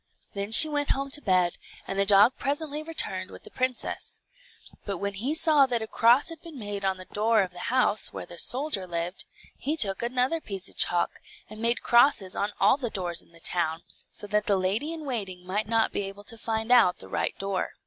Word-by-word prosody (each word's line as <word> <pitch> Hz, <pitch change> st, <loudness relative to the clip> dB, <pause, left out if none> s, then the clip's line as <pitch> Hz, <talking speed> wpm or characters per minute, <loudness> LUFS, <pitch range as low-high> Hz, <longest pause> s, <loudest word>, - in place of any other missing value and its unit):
Then 200 Hz, +1 st, -4 dB
she 270 Hz, +8 st, +12 dB
went 290 Hz, -1 st, -2 dB
home 275 Hz, 0 st, -1 dB
to 295 Hz, -, +3 dB
bed, 185 Hz, -6 st, +1 dB, 0.3 s
and 195 Hz, -, -4 dB
the 200 Hz, -, +2 dB
dog 205 Hz, +5 st, +6 dB
presently 290 Hz, +1 st, -3 dB
returned 325 Hz, +1 st, -3 dB
with -, -, -13 dB
the 430 Hz, -, -14 dB
princess. 255 Hz, -1 st, -3 dB, 0.6 s
But 200 Hz, -2 st, -4 dB
when 200 Hz, +2 st, -3 dB
he 245 Hz, +10 st, -2 dB
saw 310 Hz, -4 st, +5 dB
that 240 Hz, -3 st, -1 dB
a -, -, -2 dB
cross 235 Hz, +6 st, +3 dB
had 330 Hz, -1 st, -9 dB
been 330 Hz, -4 st, -11 dB
made 205 Hz, -3 st, -6 dB
on 190 Hz, -1 st, -1 dB
the 185 Hz, -, -10 dB
door 220 Hz, +2 st, +1 dB
of 185 Hz, -, -6 dB
the 180 Hz, -, -12 dB
house, 245 Hz, -4 st, +3 dB
where -, -, -7 dB
the 175 Hz, -, -9 dB
soldier 255 Hz, -8 st, +1 dB
lived, 170 Hz, +1 st, -4 dB, 0.3 s
he 305 Hz, +3 st, -2 dB
took 195 Hz, -9 st, 0 dB
another 255 Hz, +7 st, 0 dB
piece 195 Hz, -5 st, -6 dB
of -, -, -13 dB
chalk 175 Hz, -1 st, 0 dB, 0.3 s
and 215 Hz, 0 st, -9 dB
made 235 Hz, +1 st, +1 dB
crosses 235 Hz, -6 st, +3 dB
on 205 Hz, +1 st, -2 dB
all -, -, +4 dB
the 250 Hz, -5 st, -4 dB
doors 180 Hz, -5 st, -4 dB
in -, -, -24 dB
the 165 Hz, -, -13 dB
town, 165 Hz, -1 st, -2 dB, 0.3 s
so -, -, -7 dB
that 210 Hz, 0 st, -1 dB
the 200 Hz, -, +2 dB
lady 200 Hz, +12 st, -1 dB
in 320 Hz, -2 st, -7 dB
waiting 195 Hz, -9 st, -4 dB
might 205 Hz, +3 st, -3 dB
not 225 Hz, 0 st, +1 dB
be -, -, -2 dB
able 195 Hz, +1 st, -7 dB
to 230 Hz, +3 st, -6 dB
find 225 Hz, 0 st, -3 dB
out 230 Hz, -8 st, +5 dB
the -, -, -13 dB
right -, -, -3 dB
door. 195 Hz, -1 st, -3 dB
215 Hz, 220 wpm, -26 LUFS, 195-265 Hz, 0.6 s, she